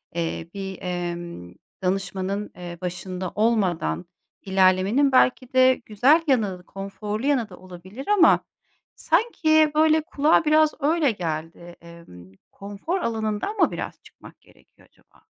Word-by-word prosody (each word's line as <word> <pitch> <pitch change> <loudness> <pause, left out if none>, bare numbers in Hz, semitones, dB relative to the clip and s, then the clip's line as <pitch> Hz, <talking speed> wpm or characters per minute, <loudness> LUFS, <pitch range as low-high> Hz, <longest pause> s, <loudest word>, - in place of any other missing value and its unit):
eee, 165 0 -3
bir, 195 -1 -6
emm, 175 - -5 0.3
danışmanın, 195 +2 -2
eee, 175 0 -8
başında 180 0 -5
olmadan 185 - 0 0.4
ilerlemenin 190 +8 +3
belki 255 0 +2
de 260 0 +5
güzel 265 +10 +4
yanı, 205 -9 0
konforlu 205 +4 -6
yanı 250 -7 +1
da 180 - -12
olabilir 185 +7 -11
ama 405 -5 +5 0.6
sanki, 315 -5 +2
böyle, 315 0 +4
kulağa 310 0 +2
biraz 310 0 +4
öyle 300 -2 +2
geldi. 170 -1 -6
Emm, 165 - -14 0.2
konfor 205 - -5
alanından 220 - -2
mı - - +3
biraz - - -6
çıkmak - - -17
gerekiyor - - -25
acaba? - - -29
200 Hz, 120 wpm, -24 LUFS, 180-280 Hz, 0.6 s, de